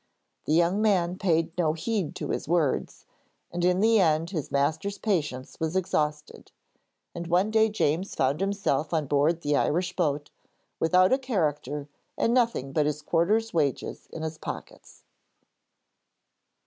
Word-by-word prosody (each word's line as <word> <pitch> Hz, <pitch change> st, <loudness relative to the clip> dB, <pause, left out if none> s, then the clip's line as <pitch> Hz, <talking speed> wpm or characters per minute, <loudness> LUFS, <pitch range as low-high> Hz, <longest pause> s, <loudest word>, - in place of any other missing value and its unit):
The 155 Hz, -, +1 dB
young 175 Hz, +5 st, +3 dB
man 185 Hz, -5 st, +2 dB
paid 165 Hz, -3 st, +1 dB
no 155 Hz, -3 st, +2 dB
heed 185 Hz, +1 st, -2 dB
to -, -, -5 dB
his -, -, -3 dB
words, 160 Hz, -4 st, 0 dB, 0.5 s
and 175 Hz, 0 st, -3 dB
in 180 Hz, +1 st, +3 dB
the 225 Hz, 0 st, +5 dB
end 165 Hz, -1 st, +2 dB
his 155 Hz, -8 st, -3 dB
master's 160 Hz, +8 st, 0 dB
patience 150 Hz, -, -2 dB
was 160 Hz, +2 st, -2 dB
exhausted, 150 Hz, -5 st, -2 dB, 0.6 s
and 170 Hz, 0 st, -6 dB
one 180 Hz, +5 st, +2 dB
day 220 Hz, 0 st, +4 dB
James 185 Hz, -2 st, -1 dB
found 135 Hz, +5 st, +1 dB
himself 195 Hz, -6 st, 0 dB
on 155 Hz, -2 st, 0 dB
board 145 Hz, +4 st, +1 dB
the 145 Hz, -1 st, +1 dB
Irish 180 Hz, +5 st, 0 dB
boat, 145 Hz, -4 st, -1 dB, 0.5 s
without 185 Hz, +5 st, +4 dB
a 265 Hz, -, +3 dB
character 150 Hz, -, -2 dB, 0.3 s
and 230 Hz, -, +2 dB
nothing 230 Hz, -, +1 dB
but 150 Hz, 0 st, +2 dB
his 150 Hz, 0 st, -3 dB
quarter's 210 Hz, +9 st, +1 dB
wages 145 Hz, -5 st, -1 dB
in 160 Hz, -, -6 dB
his 160 Hz, 0 st, -5 dB
pockets. -, -, -9 dB
165 Hz, 150 wpm, -27 LUFS, 150-190 Hz, 0.6 s, the